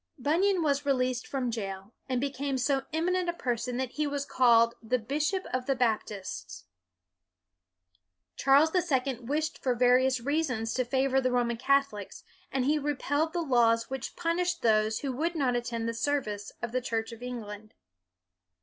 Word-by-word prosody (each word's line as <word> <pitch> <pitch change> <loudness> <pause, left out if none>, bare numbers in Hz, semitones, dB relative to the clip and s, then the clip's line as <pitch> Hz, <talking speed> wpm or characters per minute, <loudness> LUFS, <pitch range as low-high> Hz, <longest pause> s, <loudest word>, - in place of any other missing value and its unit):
Bunyan 345 +7 +2
was 285 -1 +1
released 255 -3 0
from 255 -3 -2
jail, 195 -1 -5 0.2
and 255 -1 +1
be 280 +2 -1
came 275 0 -2
so 270 +2 0
eminent 350 +3 0
a - - 0
person 245 -4 -2
that 260 -1 -2
he 300 -1 -1
was 285 -1 -2
called 235 -3 +4
" - - -43
the 240 +2 0
bishop 300 - -1
of 255 0 -1
the 275 - +2
Baptists." 195 - -3 1.7
Charles 280 +4 +4
the 365 - +3
Second 260 -6 -1
wished 310 +2 -1
for 255 -2 +1
various 250 +2 +4
reasons 255 -4 -1
to 255 - +1
favor 265 +1 +2
the 255 - +1
Roman 240 -1 +1
Catholics, 275 -6 0 0.3
and 265 -2 0
he 300 +2 +2
repealed 290 +2 0
the 345 0 -1
laws 230 -4 +3
which 265 -1 -5
punished 350 +1 -1
those 215 -1 +3
w 275 - -2
r - - -6
ho - - -8
would 340 +1 0
not 265 -5 +1
attend 235 -1 -2
the 230 - -1
service 230 -5 -2
of 240 - -2
the 255 +1 0
Church 225 -1 -2
of 230 0 -10
England. 215 -4 -7
255 Hz, 175 wpm, -29 LUFS, 235-285 Hz, 1.7 s, called